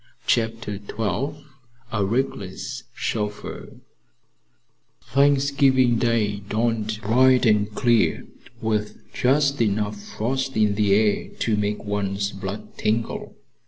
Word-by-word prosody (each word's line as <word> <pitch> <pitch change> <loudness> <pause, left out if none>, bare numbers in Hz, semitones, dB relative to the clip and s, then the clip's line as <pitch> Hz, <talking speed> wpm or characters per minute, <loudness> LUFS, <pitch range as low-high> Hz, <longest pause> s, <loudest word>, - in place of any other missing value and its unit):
CHAPTER 115 -2 0
XII 120 +8 -3 0.5
A 105 -3 0
RECKLESS 100 -4 -3
CHAUFFEUR 105 -2 -4 1.2
Thanksgiving 140 -3 +3
Day 110 -4 +1
dawned 110 +1 -1
bright 125 +4 +4
and 105 -1 +3
clear, 120 -3 +2 0.3
with 105 -1 -1 0.2
just 140 +1 +2
enough 105 -1 0
frost 130 +5 -3
in 105 -1 +3
the 100 -1 +3
air 105 -1 +1
to 110 - +2
make 105 0 -1
one's 100 -1 -1
blood 100 +1 -7
tingle. 110 +2 -1
110 Hz, 100 wpm, -23 LUFS, 105-125 Hz, 1.2 s, bright